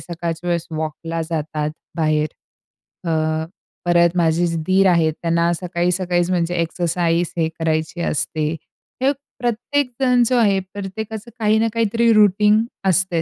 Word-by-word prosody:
सकाळच्या 170 0 -5
वेळेस 170 -1 0
वॉकला 160 +1 -4
जातात 150 -1 -2 0.3
बाहेर. 155 -1 +2 0.8
अ, 160 0 0 0.4
परत 170 0 +4
माझे 170 0 +2
जे 165 0 -2
दीर 190 +2 +3
आहेत 165 -3 +3
त्यांना 170 0 +2
सकाळी-सकाळीच 175 0 0
म्हणजे 175 -1 0
एक्सरसाइज 170 0 0
हे 160 - +2
करायची 160 +1 -1
असते. 155 -1 -1 0.5
हे 275 - +4 0.3
प्रत्येकजण 250 +1 +1
जो 250 +1 +2
आहे, 200 -4 +3
प्रत्येकाचं 215 +3 -6
काही 215 0 +3
ना 225 - +2
काहीतरी 230 +1 +2
रुटीन 210 +1 +4 0.2
असतंय 185 -2 +2
175 Hz, 125 wpm, -20 LUFS, 165-210 Hz, 0.8 s, परत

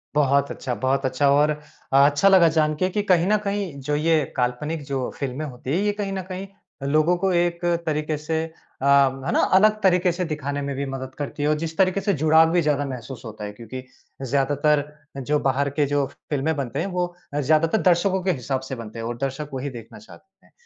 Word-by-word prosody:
बहुत 140 -1 +2
अच्छा, 125 -3 -4
बहुत 130 +2 0
अच्छा 140 +2 +2
और 145 +2 +4
अ, 145 -2 +1
अच्छा 145 +6 +3
लगा 185 -4 +6
जान 155 0 +2
के 185 +5 0
कि 210 +3 -1
कहीं 175 0 +4
न 215 +1 +4
कहीं 200 -7 -3
जो 145 +2 -1
ये 155 0 +2
काल्पनिक 140 +5 -1
जो 135 -3 -2
फिल्में 140 +2 -3
होती 130 -1 -7
हैं, 190 - +1
ये 210 - +2
कहीं 195 -1 -2
न 190 - -3
कहीं 190 +1 -5 0.4
लोगों 155 +4 +3
को 190 +1 0
एक 170 0 +1 0.3
तरीके 155 0 -1
से 160 +2 -2 0.4
अ, - - -1
है 135 -1 +3
ना? - - +2
अलग 215 +2 +5
तरीके 180 -1 +4
से 180 +1 -2
दिखाने 145 -3 -3
में 140 -1 -3
भी 140 +1 -2
मदद 130 -1 -6
करती 145 0 -4
है। 150 - +2
और 155 - +3
जिस 160 0 -5
तरीके 190 0 +2
से 200 0 +1
जुड़ाव 160 +1 +4
भी 175 0 +3
ज़्यादा 145 -2 +1
महसूस 125 -1 -7
होता 110 -1 -8
है 105 - -5
क्योंकि 120 +4 -8 0.4
ज़्यादातर 145 +2 +1 0.5
जो 150 0 +3
बाहर 140 +2 +1
के 145 +1 0
जो 145 0 +1 0.2
फिल्में 150 +2 0
बनते 135 -1 -3
हैं 180 - -1
वो 180 -1 -1 0.3
अ, 145 - 0
ज़्यादातर 155 +8 +2
दर्शकों 185 +1 +2
के 190 - +2
हिसाब 130 -2 -2
से 130 - -3
बनते 115 -1 -8
हैं, 115 - -4
और 120 0 -4
दर्शक 135 +2 -3
वही 135 +2 -3
देखना 115 -3 -10
चाहते 195 - -18
हैं। - - -26
150 Hz, 220 wpm, -23 LUFS, 135-170 Hz, 0.5 s, लगा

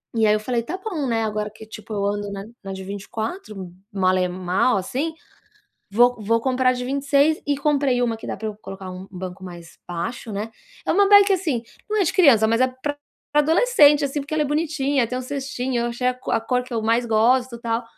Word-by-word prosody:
E 225 -1 +3
aí 210 - +5
eu 215 - +2
falei: 235 +2 -1
"Tá 330 +11 -5
bom, 330 -11 -2
né, 225 -2 0
agora 210 -1 -2
que, 220 0 -12
tipo, 215 0 -9
eu 200 -1 -1
ando 205 0 -2
na 195 0 -6 0.2
na 195 0 -5
de 190 - -7
24, 205 - -6 0.2
mal 185 -2 +2
e 180 - +2
mal 185 +6 +1
assim, 270 - -2 0.8
vou 245 +4 +4
vou 230 +3 +2
comprar 255 +1 +2
a - - +2
de 250 - -4
26", 280 +3 +2
e 285 -1 +1
comprei 280 -4 +1
uma 230 -2 0
que 225 - -10
dá - - -4
pra 220 - -4
eu 210 - -7
colocar 190 -1 -8
um 185 +1 -8
banco 185 +1 -7
mais 170 -2 -11
baixo, 210 +7 -4
né. 210 +3 -4 0.4
É - - +1
uma 400 +2 +4
bike 405 0 +7
assim, 320 -11 0 0.3
não 430 - +1
é 385 - +4
de - - 0
criança, 265 - +5
mas 230 +2 +2
é 255 - +5
pra 260 +3 -5 0.4
pra 295 - +5
adolescente, 310 -4 +5
assim, 280 +1 -2
porque 285 +2 -5
ela 310 - +2
é - - -1
bonitinha, 290 -4 0
tem 250 - -4
um - - -4
cestinho, 260 -2 -3
eu 235 - -1
achei 245 +1 -1
a 255 - 0
co 255 - -7
a - - +2
cor 250 +2 -1
que 250 - -7
eu 225 - -1
mais 230 +2 +2
gosto, 235 +2 +2
tal. 230 0 -1
240 Hz, 235 wpm, -22 LUFS, 210-280 Hz, 0.8 s, bike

